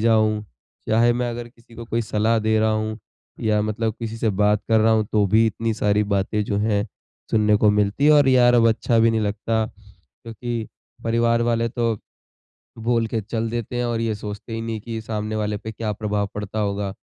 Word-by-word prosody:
जाऊँ, 110 -1 +2 0.4
चाहे 115 +2 +4
मैं 120 0 -1
अगर 120 0 -6
किसी 115 -1 -21
को 115 - -8
कोई 115 0 -1
सलाह 110 +1 +1
दे 110 0 +1
रहा 110 0 +2
हूँ। 110 +1 -2 0.4
या 110 -1 +1
मतलब 110 +1 -2
किसी 115 -1 -4
से 110 -2 +1
बात 105 +1 +2
कर 110 -1 +4
रहा 110 +1 +4
हूँ, 110 -1 +2
तो 105 -2 +3
भी 110 +4 +4
इतनी 110 +1 -1
सारी 105 -1 +2
बातें 100 +1 0
जो 100 - -2
हैं, 105 0 +1 0.4
सुनने 105 -1 +3
को 105 0 +4
मिलती 105 +5 +1
है 155 - +7
और 145 -2 +5
यार 125 -2 +5
अब 115 -1 +5
अच्छा 115 +1 +1
भी 115 0 +5
नहीं 110 0 0
लगता, 110 +2 -1 0.4
क्योंकि 115 - -6 0.4
परिवार 115 0 +2
वाले 115 0 +1
तो 115 -1 0 0.8
बोल 115 0 +1
के 110 0 -2
चल 115 +2 -3
देते 120 +1 -4
हैं, 120 - 0
और 120 -1 -1
ये 115 -1 0
सोचते 105 +2 -7
ही 115 - -3
नहीं 115 -1 -4
कि 115 0 -5
सामने 110 0 -3
वाले 105 -1 -1
पे 110 +1 -7
क्या 110 0 -3
प्रभाव 105 -1 -2
पड़ता 105 +1 -5
होगा। 100 -1 -2
110 Hz, 205 wpm, -22 LUFS, 105-115 Hz, 0.8 s, है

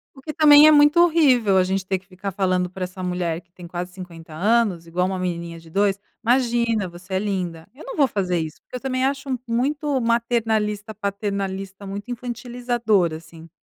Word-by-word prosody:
O 270 - -14
que 305 +2 -6
também 295 0 +8
é 310 - +8
muito 295 +2 +5
horrível 265 - +4
a 185 - +5
gente 190 +1 -1
ter 190 0 0
que 185 - -17
ficar 195 +1 -6
falando 185 -1 0
pra 185 0 -6
essa 185 +1 -6
mulher 180 -2 -2
que 175 0 -40
tem 175 - -11
quase 180 +1 -6
50 170 -4 -10
anos, 200 -1 +1
igual 180 +2 -1
uma 190 0 -2
menininha 170 -2 -4
de 165 0 -16
dois, 195 +2 +1 0.2
imagina 235 -4 +1
você 180 +2 -11
é 190 - +2
linda. 180 -5 -3
Eu 285 - -13
não - - -6
vou 285 -3 +4
fazer 185 -6 -1
isso, 160 -1 -6
porque - - -11
eu - - -3
também 260 -1 -1
acho 280 +1 -2 0.2
muito 275 +3 0
maternalista, 225 -2 0
paternalista, 200 -1 -4
muito 205 +5 -6
infantilizadora 240 -7 -1
assim. 165 0 -14
200 Hz, 195 wpm, -22 LUFS, 180-240 Hz, 0.2 s, também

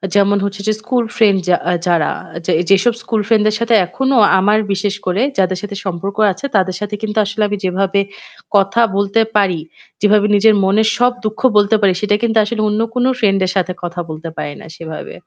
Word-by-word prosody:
যেমন 200 0 +3
হচ্ছে 200 0 -4
যে 215 - +2
স্কুল 240 +1 0
ফ্রেন্ড 205 -4 +4
যা 175 - +4 0.3
যারা 170 -3 +2
আ - - -12
যে - - +1 0.2
যেসব 195 +5 +3
স্কুল 220 -2 -1
ফ্রেন্ডদের 215 -2 +2
সাথে 230 0 0
এখনো 265 +9 -1 0.2
আমার 210 +3 +3
বিশেষ 200 +1 -2
করে 185 +4 0 0.2
যাদের 185 -1 +1
সাথে 205 -1 -6
সম্পর্ক 195 +3 -4
আছে 235 - -7
তাদের 185 -2 +1
সাথে 210 0 -4
কিন্তু 220 0 -4
আসলে 220 +2 -4
আমি 205 0 -3
যেভাবে 195 +2 0 0.6
কথা 200 +4 +3
বলতে 200 +3 +1
পারি, 190 -5 +2 0.4
যেভাবে 210 0 +3
নিজের 215 +2 +5
মনের 210 +3 +2
সব 245 +1 +3
দুঃখ 215 0 -3 0.2
বলতে 205 +2 +4
পারি, 195 -2 +3
সেটা 205 0 +1
কিন্তু 225 -1 +1
আসলে 225 0 -3
অন্য 210 +2 0
কোন 250 - +1
ফ্রেন্ড 195 -4 +2
এর 185 - -2
সাথে 185 -1 0
কথা 175 0 -5
বলতে 160 +1 -7
পারি 145 - -4
না - - -12
সেভাবে। 160 -2 -8
205 Hz, 195 wpm, -16 LUFS, 190-220 Hz, 0.6 s, নিজের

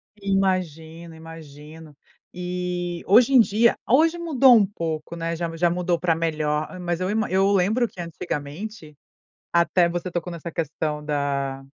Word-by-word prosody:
Imagino, 175 -5 -2
imagino. 160 -1 -12 0.4
E 180 -1 -4
hoje 235 +7 +5
em 260 - +8
dia, 225 +1 +3
hoje 320 +7 +3
mudou 275 -7 +5
um 215 -3 +5
pouco, 165 -4 -5
né, 165 0 -3
já 165 0 -4
já 175 +1 +2
mudou 175 0 -1
pra 170 -2 +1
melhor. 155 +1 -2
Mas 175 -1 -2
eu 185 0 -2
ima 215 +1 -1
eu 195 +2 +2
lembro 205 +6 +2
que 180 - -9
antigamente, 165 +2 -6 0.6
até 170 +1 +3
você 175 +1 -4
tocou 175 0 -4
nessa 170 0 -7
questão 150 -1 -3
da 140 -2 -2
170 Hz, 150 wpm, -23 LUFS, 160-195 Hz, 0.6 s, em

